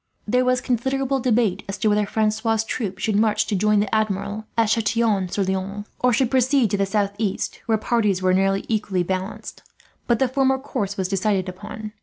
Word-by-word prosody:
There 250 +4 +2
was 255 0 +2
considerable 265 +2 0
debate 225 -6 +1
as 195 - -3
to 205 - 0
whether 210 0 +2
Francois' 220 +1 0
troop 200 -6 -3
should 215 -2 -1
march 215 0 +2
to 210 - -2
join 210 +2 +3
the 205 - -3
Admiral, 205 0 -1
at 225 -2 +3
Chatillon 220 -3 +1
sur 200 - -1
Loing; 190 +2 -3
or 250 0 +3
should 245 0 +1
proceed 260 -3 +3
to 205 - +1
the 195 0 +1
southeast, 200 0 -1
where 220 -1 +3
parties 210 -4 +1
were 185 0 +2
nearly 195 +1 +1
equally 205 -5 0
balanced; 185 +3 -5 0.5
but 240 -2 +3
the 265 - +2
former 265 +1 +2
course 205 -7 -4
was 190 -2 -1
decided 195 0 0
upon. 210 +3 -7
210 Hz, 190 wpm, -22 LUFS, 195-235 Hz, 0.5 s, join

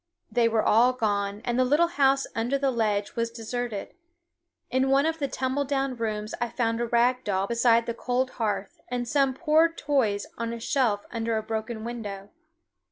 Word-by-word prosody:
They 235 -1 +3
were 225 -1 +1
all 240 +4 +4
gone, 205 -3 -1
and 240 0 0
the - - +5
little 295 +7 +3
house 275 -4 +3
under 240 +5 0
the 275 -1 +1
ledge 210 -4 -1
was 230 0 0
deserted. 230 -2 -5 0.8
In 260 +1 +2
one 275 +2 +4
of 325 0 -1
the 280 - 0
tumble 260 +2 -1
down 270 -1 -1
rooms 215 -2 -3
I 240 - 0
found 230 -1 -1
a 240 - 0
rag 245 +2 +2
doll 195 -1 0
beside 235 +1 +3
the 235 - -2
cold 250 +2 -1
hearth, 205 -2 -2
and 245 -1 -3
some 275 0 +2
poor 320 +2 +4
toys 265 -11 0
on 230 0 -2
a 235 - -6
shelf 230 -4 0
under 230 -1 -1
a 220 - -2
broken 220 0 -4
window. 205 -4 -6
235 Hz, 185 wpm, -26 LUFS, 220-265 Hz, 0.8 s, the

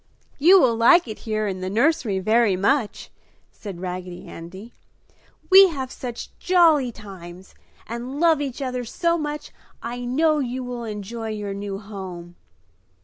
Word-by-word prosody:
"You 360 +7 +7
will 245 -7 +3
like 255 +8 +5
it 215 - -7
here 215 0 0
in 185 -2 -4
the 185 - -3
nursery 235 -1 +1
very 215 +1 +2
much!" 210 +4 0 0.4
said 195 -5 -9
Raggedy 180 -1 -6
Andy. 190 +7 -10 0.8
"We 385 +1 +10
have 265 -7 -5
such 245 -2 -7
jolly 325 -8 +4
times 190 -4 -12 0.3
and 245 +4 -6
love 325 -3 +4
each 275 -1 -4
other 250 -1 -3
so 335 +8 0
much 300 -2 -4 0.3
I 240 +1 -6
know 305 +5 +2
you 255 -1 -3
will 245 -1 -5
enjoy 220 +2 -6
your 210 -2 -4
new 200 0 -5
home!" 190 -4 -9
235 Hz, 145 wpm, -23 LUFS, 195-280 Hz, 0.8 s, We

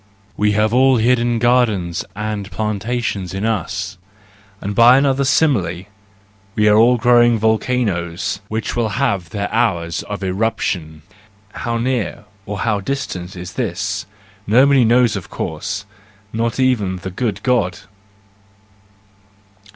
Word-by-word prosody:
We 105 0 +1
have 105 +2 +1
all 130 +1 +5
hidden 120 +1 +2
gardens 110 -8 +1
and 105 -1 -4
plantations 105 -3 -3
in 95 +3 -2
us; 95 -4 -3 0.6
and 100 - -4
by 120 +4 +7
another 140 0 +2
simile, 120 - +1 0.7
we 105 0 +3
are 105 - +5
all 120 +3 +5
growing 120 -1 +4
volcanoes, 110 -6 -1
which 110 +1 -3
will 115 -2 0
have 100 -11 0
their 100 +3 -3
hours 85 -2 0
of 100 -1 -6
eruption:—how 100 +2 -4
near 120 -3 -2 0.2
or 100 -1 -4
how 105 -3 +1
distant 95 -6 -4
this 90 +5 -8
is, 100 -2 -2 0.4
nobody 130 +5 +5
of 120 -6 +2
course 95 +5 -4 0.5
knows, 115 - -2
not 115 +2 -3
even 115 -8 +1
the 95 +1 -6
good 100 -1 -3
God. 110 -9 +1
105 Hz, 120 wpm, -18 LUFS, 95-120 Hz, 0.7 s, by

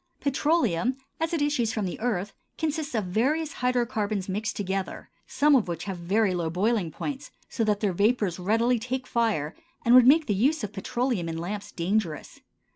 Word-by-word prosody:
Petroleum 270 - +1 0.2
as 325 +1 -1
it 325 -4 0
issues 255 -6 +1
from 215 -3 -2
the 180 - -4
earth 205 -4 -2 0.2
consists 310 -3 -2
of 215 - +1
various 285 - 0
hydrocarbons 230 -6 0
mixed 210 +3 -2
together, 195 -2 -4 0.2
some 290 +3 +3
of 240 -8 +2
which 170 -1 -4
have 190 -3 -5
very 195 +3 +1
low 170 -2 -1
boiling 195 +1 0
points, 275 - -5 0.2
so 230 - -1
that 210 -2 +1
their 200 -4 +1
vapors 200 -2 +1
readily 230 +6 +2
take 255 +3 -3
fire 215 -12 0 0.3
and 235 - +5
would 250 -1 +8
make 310 +3 +6
the 210 - 0
use 265 +8 +1
of 210 - -4
petroleum 235 -4 -1
in 165 - -4
lamps 200 +5 -5
dangerous. 175 -2 -2
220 Hz, 180 wpm, -26 LUFS, 190-255 Hz, 0.3 s, would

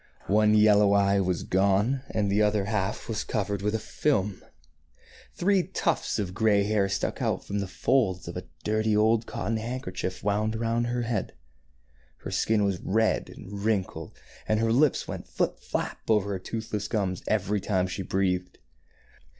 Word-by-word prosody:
One 105 0 +5
yellow 105 -1 +5
eye 100 0 +3
was 90 -2 0
gone, 100 +7 +2
and 105 -2 0
the 105 +2 +3
other 105 0 +3
was 100 - -4
half 105 +1 -2
cov 105 -2 -1
ered 100 -1 -2
with 105 +2 0
a - - +2
film. 105 -4 -1 0.9
Three 195 +1 +3
tufts 170 -2 -1
of 95 -4 -3
gray 105 0 +3
hair 100 -1 +1
stuck 100 - -2
out - - -1
from 100 - -2
the 100 - -2
folds 95 -4 +1
of - - -6
a - - -5 0.2
dirty 110 0 +1
old 110 +1 +3
cotton 110 +4 -2
handkerchief 110 -6 -4
wound 105 +2 0
around 115 +1 0
her 120 0 -1
head. 115 -1 -2 0.9
Her - - -6
skin 110 -2 +2
was 100 -3 0
red 110 +3 +1
and 100 +1 -8
wrinkled, 105 -4 -2 0.3
and 110 0 +2
her 115 0 +2
lips 140 +4 +3
went - - -6
flip - - -1
flap - - -3
over 105 -2 +2
her 95 - -2
toothless 110 0 -4
gums 95 -5 -1
every 105 -1 0
time 95 -3 +1
she 95 +2 -4
breathed. 90 -1 -1
105 Hz, 170 wpm, -27 LUFS, 100-110 Hz, 0.9 s, One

